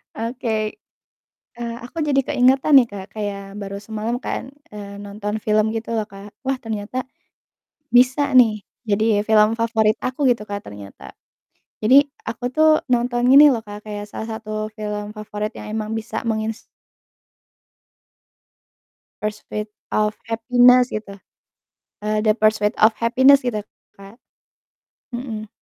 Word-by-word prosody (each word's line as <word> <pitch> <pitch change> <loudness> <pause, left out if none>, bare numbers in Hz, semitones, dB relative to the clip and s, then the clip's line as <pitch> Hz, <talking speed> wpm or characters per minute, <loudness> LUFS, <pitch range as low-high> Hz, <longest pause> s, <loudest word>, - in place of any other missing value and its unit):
Oke. 225 -2 -3 0.8
Eee, 235 -1 -5
aku 250 +7 -9
jadi 280 -2 +2
keingetan 265 +3 +4
nih 265 - +8
Kak 195 -2 -7
kayak 200 -1 -5
baru 200 -1 -6
semalam 220 +3 -4
kan, 260 0 -5 0.2
eee, 200 -1 -9
nonton 205 +1 -5
film 215 0 +1
gitu 225 +1 -3
loh 220 - 0
Kak. 200 0 -13
Wah 265 0 -1
ternyata 225 +2 -4 0.9
bisa 260 +3 +4
nih 225 -4 +6 0.2
jadi 215 -1 +1
film 215 0 +4
favorit 220 -2 +2
aku 255 +2 0
gitu 235 -3 +1
Kak 205 0 -7
ternyata. 100 -1 -11 0.7
Jadi 225 +5 +4 0.3
aku 230 +1 -6
tuh 315 0 +5 0.3
nonton 240 0 0
ini 295 +2 +9
loh 235 -5 0
Kak, 205 0 -9
kayak 205 0 -5
salah 220 - -6
satu 215 -1 -10 0.3
film 210 -1 -4
favorit 210 0 -4
yang - - -8
emang 215 -1 -3
bisa 225 0 -4
mengins 220 0 -2 2.6
Pursuit 210 0 -4 0.2
of 210 0 +1 0.2
Happiness 245 +2 +4
gitu. 205 -2 -6 0.9
Eee, 215 0 0
The 215 -1 +3
Pursuit 215 0 +2
of 220 - +8
Happiness 260 +3 +4
gitu 215 -4 -1 0.3
Kak, 200 +4 -14 0.9
mhm. 235 -3 -5
220 Hz, 130 wpm, -21 LUFS, 210-245 Hz, 2.6 s, ini